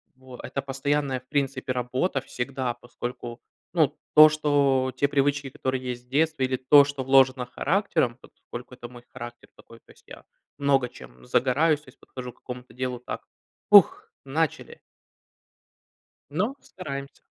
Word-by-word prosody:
Во, 130 -1 -13
это 140 - -4
постоянная, 135 0 -1
в 130 - -29
принципе, 135 -2 -1
работа 130 +4 -1
всегда, 125 0 -3
поскольку, 120 0 -7 0.3
ну, 155 -4 +2 0.2
то 155 0 +10
что 140 -4 +2
те 140 - +2
привычки, 140 0 0
которые 130 0 -3
есть 125 -1 -5
в 125 - -34
детстве, 155 -1 +1
или 130 0 -1
то, 140 +3 +7
что 145 -2 -4
вложено 130 -1 +4
характером, 155 - 0
поскольку 125 +1 -11
это 120 - -9
мой 120 0 -14
характер 120 0 -10
такой, 115 - -16
то - - -21
есть - - -22
я - - -12 0.3
много 135 -3 +2
чем 60 - -15
загораюсь, 145 - +2
то 150 - -25
есть - - -21
подхожу 125 -1 -8
к - - -30
какому-то 125 0 -9
делу 125 -1 -3
так: 125 - -7 0.5
ух, 205 -3 +6 0.2
начали! 155 +3 -2 1.5
Но 195 - -1
стараемся. 140 -6 -8
135 Hz, 150 wpm, -26 LUFS, 125-145 Hz, 1.5 s, то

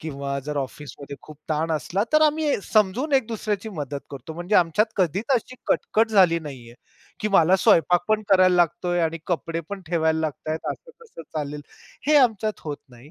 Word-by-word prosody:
किंवा 140 -3 -4
जर 150 -1 -3
ऑफिसमध्ये 140 +1 -6
खूप 155 - -13
ताण 160 +1 -1
असला, 170 +5 -1
तर 305 0 +5
आम्ही 305 -4 +2
समजून 215 +9 +1
एक 265 -4 +3
दुसऱ्याची 215 -2 -3
मदत 145 -7 -5
करतो. 140 +3 -8
म्हणजे 175 +5 -3
आमच्यात 175 +5 +3
कधीच 190 +2 0
अशी 250 +1 -2
कटकट 225 +1 +1
झाली 185 -5 +5
नाही 135 -6 -9
आहे, 120 - -14 0.5
की 215 - 0
मला 190 -2 +4
स्वयंपाक 175 -4 +4
पण 215 0 +2
करायला 185 -2 +5
लागतोय 175 0 +1
आणि 165 0 -1
कपडेपण 170 +2 -3
ठेवायला 160 -1 +1
लागतायत, 155 0 -3
असं - - -15
कसं 455 - -12 0.2
चालेल. 150 0 -4 0.5
हे 300 0 +5
आमच्यात 220 -6 +2
होत 150 -2 -4
नाही. 125 +4 -16
175 Hz, 175 wpm, -24 LUFS, 155-215 Hz, 0.5 s, तर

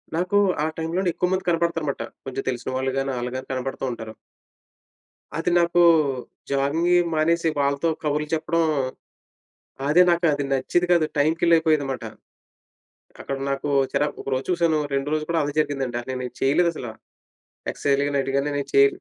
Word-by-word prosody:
నాకు 180 +4 +1 0.3
ఆ - - +2
టైంలోనే 175 +3 -1
ఎక్కువ 180 - 0
మంది 185 0 -1
కనపడతారన్నమాట. 165 -4 0 0.2
కొంచెం 135 0 -4
తెలిసిన 125 0 -3
వాళ్ళు 130 0 -1
గాని 135 0 -1
ఆళ్ళు 120 0 -3
గాని 130 - -6
కనపడుతూ 135 +1 -3
ఉంటారు. 110 -1 -7 1.2
అది 165 - 0
నాకు 170 +1 +2 0.7
జాగింగవి 160 +6 +2
మానేసి 165 +1 +2
వాళ్ళతో 140 +3 +1
కబుర్లు 150 0 0
చెప్పడం, 165 +1 0 1.3
అదే 165 +5 +6
నాకు 170 0 +1
అది 145 0 -1
నచ్చేది 135 +7 +1
కాదు. 170 -3 +4
టైం 155 +3 +4
కిల్లైపోయేదనమాట. 155 -7 +2 1.2
అక్కడ 135 - -4
నాకు 140 +1 -2 0.2
చిరా 150 - +1
ఒక - - -13
రోజు 130 +1 -2
చూసాను. 170 -3 +2
రెండో 140 +2 -1
రోజు 155 - -2
కూడా 165 -1 +2
అదే 145 - -3
జరిగిందండి. 135 -5 -1
నేనేం 125 -1 -4
చేయలేదసల 150 -1 +1 0.8
ఎక్సర్సైజ్‌లు 140 0 +1
గాని 145 - 0
ఇలాటివి 135 0 -1
గాని 140 +2 0
నేను 140 - -3
చేయ 415 0 +7
150 Hz, 150 wpm, -23 LUFS, 135-170 Hz, 1.3 s, చేయ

